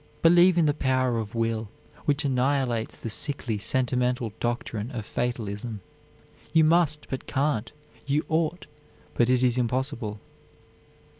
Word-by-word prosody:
Believe 175 Hz, +2 st, +6 dB
in 165 Hz, -, +4 dB
the 145 Hz, -, +3 dB
power 130 Hz, -4 st, +1 dB
of 110 Hz, 0 st, -6 dB
will, 115 Hz, -2 st, -1 dB, 0.4 s
which 145 Hz, +1 st, +1 dB
annihilates 130 Hz, -3 st, 0 dB
the -, -, -7 dB
sickly, 115 Hz, -1 st, 0 dB
sentimental 125 Hz, -1 st, 0 dB
doctrine 120 Hz, -2 st, -2 dB
of 115 Hz, -6 st, -5 dB
fatalism, 110 Hz, -3 st, -3 dB, 0.7 s
you 160 Hz, 0 st, +5 dB
must, 155 Hz, -2 st, +3 dB
but 130 Hz, -, -4 dB
can't, 130 Hz, -5 st, 0 dB, 0.4 s
you 145 Hz, +3 st, +1 dB
ought, 160 Hz, +2 st, 0 dB, 0.5 s
but 120 Hz, 0 st, +2 dB
it 130 Hz, 0 st, +3 dB
is 125 Hz, 0 st, +3 dB
impossible. 120 Hz, -3 st, -2 dB
125 Hz, 130 wpm, -26 LUFS, 115-145 Hz, 0.7 s, Believe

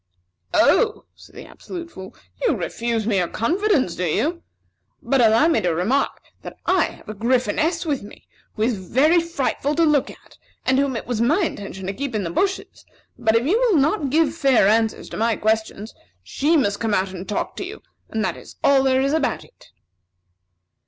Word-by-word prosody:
"Oh," 445 Hz, -3 st, +3 dB
said -, -, -18 dB
the -, -, -9 dB
Absolute 340 Hz, -2 st, -9 dB
Fool, 190 Hz, -6 st, -10 dB, 0.3 s
"you -, -, +2 dB
refuse 230 Hz, -2 st, -2 dB
me 210 Hz, -3 st, +1 dB
your 175 Hz, -, 0 dB
confidence, 325 Hz, -, 0 dB
do 180 Hz, -, -3 dB
you? 320 Hz, -, -1 dB, 0.6 s
But 270 Hz, -2 st, +2 dB
allow 225 Hz, +6 st, +5 dB
me 330 Hz, -, +2 dB
to 175 Hz, -2 st, 0 dB
remark 225 Hz, +12 st, 0 dB, 0.2 s
that -, -, -9 dB
I -, -, +3 dB
have -, -, -11 dB
a 215 Hz, -, -5 dB
Gryphoness 260 Hz, -, 0 dB
with 290 Hz, -4 st, -1 dB
me 205 Hz, -, -13 dB, 0.3 s
who 215 Hz, -, -1 dB
is 225 Hz, -3 st, 0 dB
very 310 Hz, +7 st, +4 dB
frightful 300 Hz, -3 st, -2 dB
to 335 Hz, -, +3 dB
look 300 Hz, -3 st, +2 dB
at, -, -, -16 dB, 0.3 s
and 260 Hz, +1 st, +3 dB
whom 275 Hz, -2 st, 0 dB
it 230 Hz, -, -4 dB
was 235 Hz, -2 st, -2 dB
my 300 Hz, +11 st, +2 dB
intention 195 Hz, -, -5 dB
to 195 Hz, -, -3 dB
keep 275 Hz, +2 st, -4 dB
in 210 Hz, -, -1 dB
the 170 Hz, -, -4 dB
bushes; 385 Hz, -, -2 dB, 0.3 s
but 220 Hz, -1 st, +1 dB
if 230 Hz, +2 st, +2 dB
you 390 Hz, +10 st, +2 dB
will 475 Hz, -8 st, +3 dB
not 290 Hz, +1 st, +1 dB
give 305 Hz, +1 st, +2 dB
fair 275 Hz, -10 st, +3 dB
answers 220 Hz, +1 st, +1 dB
to -, -, -7 dB
my 230 Hz, 0 st, +1 dB
questions, 220 Hz, 0 st, -2 dB, 0.3 s
she 300 Hz, -, +1 dB
must 205 Hz, -7 st, 0 dB
come 225 Hz, -2 st, 0 dB
out 190 Hz, 0 st, 0 dB
and 185 Hz, +2 st, -8 dB
talk 210 Hz, -, -3 dB
to -, -, -3 dB
you, 415 Hz, +4 st, -9 dB, 0.3 s
and 220 Hz, -1 st, -1 dB
that -, -, -2 dB
is -, -, -13 dB
all 275 Hz, -1 st, +5 dB
there 265 Hz, 0 st, +2 dB
is 275 Hz, +2 st, +1 dB
about 315 Hz, -3 st, 0 dB
it." -, -, -21 dB
260 Hz, 200 wpm, -22 LUFS, 215-315 Hz, 0.6 s, allow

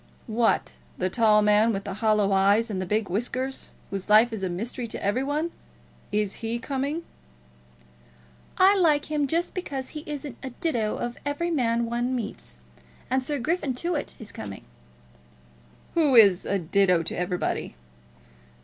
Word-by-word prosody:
"What, 230 Hz, -1 st, +1 dB, 0.2 s
the 185 Hz, 0 st, -1 dB
tall 215 Hz, -2 st, +4 dB
man 210 Hz, +2 st, +4 dB
with 200 Hz, -2 st, -3 dB
the 200 Hz, -, -5 dB
hollow 210 Hz, -2 st, +3 dB
eyes 200 Hz, +4 st, +3 dB
and 190 Hz, -2 st, -2 dB
the 185 Hz, -, -4 dB
big 210 Hz, +2 st, 0 dB
whiskers, 255 Hz, +7 st, -2 dB, 0.2 s
whose 195 Hz, 0 st, -4 dB
life 220 Hz, +3 st, +6 dB
is 215 Hz, -, -4 dB
a 190 Hz, -, -1 dB
mystery 230 Hz, +7 st, -4 dB
to 220 Hz, -, -5 dB
every 205 Hz, +6 st, +1 dB
one? 300 Hz, +4 st, -1 dB, 0.6 s
Is 210 Hz, -1 st, 0 dB
he 225 Hz, +1 st, -2 dB
coming?" 280 Hz, +6 st, -3 dB, 1.5 s
"I 385 Hz, +2 st, +6 dB
like 310 Hz, -6 st, +2 dB
him, 295 Hz, -2 st, +1 dB
just 335 Hz, +5 st, -1 dB
because 275 Hz, -8 st, -4 dB
he 300 Hz, -1 st, -7 dB
isn't 290 Hz, -4 st, -6 dB
a 265 Hz, -, -5 dB
ditto 240 Hz, -6 st, -1 dB
to -, -, -19 dB
every 290 Hz, +4 st, -2 dB
man 235 Hz, -6 st, +1 dB
one 240 Hz, +2 st, -1 dB
meets. 215 Hz, -, -6 dB, 0.5 s
And 260 Hz, 0 st, +2 dB
Sir 290 Hz, +2 st, -2 dB
Griffin 300 Hz, -1 st, -1 dB
Tewett 335 Hz, +2 st, -2 dB
is 220 Hz, -, -6 dB
coming." 100 Hz, -2 st, -8 dB, 1.3 s
"Who 300 Hz, -6 st, +3 dB
is 200 Hz, -5 st, +6 dB
a 200 Hz, -, +1 dB
ditto 180 Hz, 0 st, +2 dB
to 165 Hz, -, -3 dB
everybody." 180 Hz, 0 st, -2 dB
235 Hz, 160 wpm, -26 LUFS, 205-285 Hz, 1.5 s, life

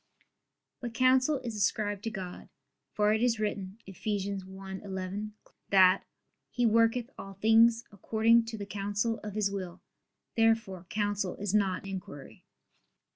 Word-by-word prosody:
But 240 Hz, -2 st, -6 dB
counsel 255 Hz, +3 st, +4 dB
is 230 Hz, -3 st, -5 dB
ascribed 205 Hz, 0 st, 0 dB
to -, -, 0 dB
God: 185 Hz, -4 st, -7 dB, 0.4 s
for 210 Hz, 0 st, +2 dB
it 220 Hz, -, 0 dB
is 235 Hz, -2 st, +2 dB
written 200 Hz, -2 st, -3 dB
(Eph. 190 Hz, -2 st, -11 dB
1:11) 195 Hz, 0 st, -4 dB, 0.4 s
that 190 Hz, -1 st, +5 dB, 0.4 s
"He 245 Hz, -, 0 dB
worketh 230 Hz, +2 st, +3 dB
all 195 Hz, 0 st, -8 dB
things 225 Hz, +3 st, +5 dB
according 225 Hz, +3 st, +3 dB
to 225 Hz, -1 st, -6 dB
the 200 Hz, -, -5 dB
counsel 205 Hz, +3 st, -2 dB
of 210 Hz, -1 st, -7 dB
His 205 Hz, -2 st, +1 dB
will." 185 Hz, -3 st, -5 dB, 0.6 s
Therefore 225 Hz, -6 st, +1 dB
counsel 205 Hz, -3 st, -1 dB
is 205 Hz, -1 st, -3 dB
not 195 Hz, -3 st, +1 dB
inquiry. 185 Hz, -7 st, -8 dB
205 Hz, 130 wpm, -30 LUFS, 195-225 Hz, 0.6 s, that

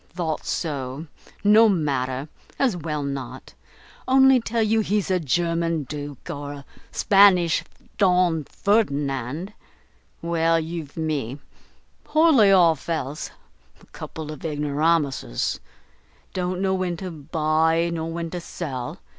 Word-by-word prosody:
"Thought 165 Hz, -4 st, -4 dB
so. 140 Hz, -2 st, -3 dB, 0.4 s
No 215 Hz, +2 st, +6 dB
matter, 140 Hz, -6 st, -1 dB, 0.3 s
as 255 Hz, -8 st, +2 dB
well 150 Hz, -3 st, -3 dB
not. 140 Hz, -1 st, -6 dB, 0.5 s
Only 265 Hz, 0 st, +6 dB
tell 230 Hz, 0 st, 0 dB
you 220 Hz, +1 st, +2 dB
he's 210 Hz, -2 st, 0 dB
a 185 Hz, -, +2 dB
German 165 Hz, +1 st, 0 dB
Duke, 145 Hz, 0 st, -8 dB
or 145 Hz, 0 st, -5 dB
a 140 Hz, -1 st, -10 dB, 0.3 s
Spanish 195 Hz, -4 st, +4 dB, 0.4 s
Don 180 Hz, -5 st, +3 dB
Ferdinand. 145 Hz, -, -1 dB, 0.7 s
Well, 165 Hz, -1 st, +2 dB
you've 160 Hz, -2 st, -6 dB
me! 145 Hz, -6 st, -2 dB, 0.7 s
poorly 310 Hz, -10 st, +5 dB
off 170 Hz, -5 st, +4 dB
else. 155 Hz, -3 st, -3 dB, 0.5 s
A -, -, -20 dB
couple 155 Hz, -1 st, -7 dB
of 155 Hz, -, -10 dB
ignoramuses! 150 Hz, -, 0 dB, 0.7 s
don't 180 Hz, 0 st, -2 dB
know 190 Hz, 0 st, +1 dB
when 185 Hz, -2 st, -1 dB
to 185 Hz, +1 st, -6 dB
buy 160 Hz, +2 st, +1 dB
nor 165 Hz, 0 st, -3 dB
when 165 Hz, 0 st, -4 dB
to 180 Hz, -, -4 dB
sell. 135 Hz, -8 st, -5 dB
165 Hz, 120 wpm, -23 LUFS, 145-185 Hz, 0.7 s, No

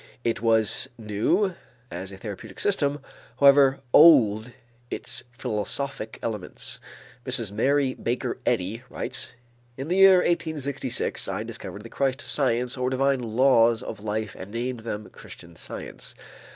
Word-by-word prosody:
It 115 Hz, -2 st, -1 dB
was 110 Hz, -2 st, +2 dB
new 115 Hz, -, 0 dB, 0.4 s
as 95 Hz, +3 st, -6 dB
a 95 Hz, -, -9 dB
therapeutic 105 Hz, -2 st, -8 dB
system, 145 Hz, -8 st, +1 dB, 0.4 s
however 140 Hz, -1 st, +6 dB
old 120 Hz, -8 st, +6 dB, 0.4 s
its -, -, -5 dB
philosophic 125 Hz, 0 st, -3 dB
elements. 105 Hz, -5 st, -5 dB, 0.4 s
Mrs. 120 Hz, -5 st, -1 dB
Mary 135 Hz, +5 st, +2 dB
Baker 120 Hz, 0 st, -3 dB
Eddy 100 Hz, +6 st, -1 dB
writes: 130 Hz, 0 st, -4 dB, 0.4 s
"In 135 Hz, +4 st, -5 dB
the 180 Hz, -, +1 dB
year 195 Hz, -1 st, +8 dB
1866 155 Hz, -6 st, -1 dB
I -, -, -3 dB
discovered 105 Hz, -, -7 dB
the 115 Hz, -, -10 dB
Christ 135 Hz, +2 st, -1 dB
science 125 Hz, -3 st, +1 dB
or 125 Hz, 0 st, 0 dB
divine 135 Hz, 0 st, +1 dB
laws 115 Hz, 0 st, +3 dB
of 110 Hz, -, -7 dB
life 110 Hz, 0 st, -3 dB
and 95 Hz, -, -9 dB
named 120 Hz, +3 st, -3 dB
them 110 Hz, -2 st, -5 dB
Christian 85 Hz, 0 st, -13 dB
Science. -, -, -9 dB
120 Hz, 130 wpm, -25 LUFS, 110-140 Hz, 0.4 s, year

